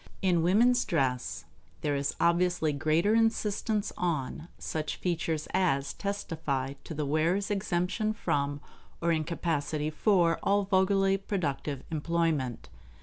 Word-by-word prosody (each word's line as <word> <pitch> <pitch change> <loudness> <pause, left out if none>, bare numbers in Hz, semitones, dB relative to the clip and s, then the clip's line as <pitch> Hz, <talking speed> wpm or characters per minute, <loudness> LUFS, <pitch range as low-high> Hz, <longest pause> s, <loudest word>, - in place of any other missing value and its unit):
In 180 -3 +3
woman's 235 +8 +4
dress 125 - -1 0.4
there 145 -1 0
is 140 0 -1
obviously 170 -2 +2
greater 155 +8 +2
insistence 220 -1 +1
on 155 -2 -2
such 155 -1 -3
features 165 -3 -2
as 150 -7 +1
testify 155 -9 -3
to 160 - -6
the 150 0 -1
wearer's 165 +8 +1
exemption 195 +2 0
from 145 -8 -1 0.4
or 170 0 +1
incapacity 155 -2 -1
for 170 -1 +3
all 200 +1 +2
vulgarly 195 0 +3
productive 145 -8 -3
employment. 155 -5 -1
170 Hz, 115 wpm, -29 LUFS, 150-195 Hz, 0.4 s, woman's